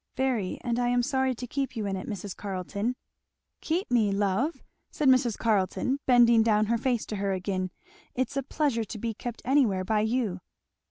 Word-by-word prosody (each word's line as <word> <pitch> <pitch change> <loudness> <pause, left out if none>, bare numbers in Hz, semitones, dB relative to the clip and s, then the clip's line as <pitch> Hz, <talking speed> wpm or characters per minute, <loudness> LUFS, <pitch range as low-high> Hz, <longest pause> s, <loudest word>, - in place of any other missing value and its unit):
"Very, 255 -8 -1
and 240 -1 0
I 245 - +1
am 245 0 +2
sorry 265 -1 +1
to 250 - -6
keep 265 +1 -3
you 220 -2 -2
in 195 -1 -1
it, 185 - -6
Mrs. 200 -2 -5
Carleton." 200 +4 -3 0.7
"Keep 335 -1 -1
me, 220 -4 +3
love?" 205 - 0 0.3
said 295 - -1
Mrs. 255 -4 +4
Carleton 225 +5 +1
bending 235 -2 +6
down 215 -1 +3
her 230 +2 +1
face 245 -2 0
to 210 - -5
her 195 0 0
again; 185 0 -2 0.2
" - - -28
it's 260 +2 -1
a 275 - +1
pleasure 275 -3 0
to 220 +1 -7
be 225 +1 -3
kept 240 +2 -7
anywhere 240 -8 +3
by 215 +2 +1
you." 220 -3 0
230 Hz, 195 wpm, -28 LUFS, 205-255 Hz, 0.7 s, bending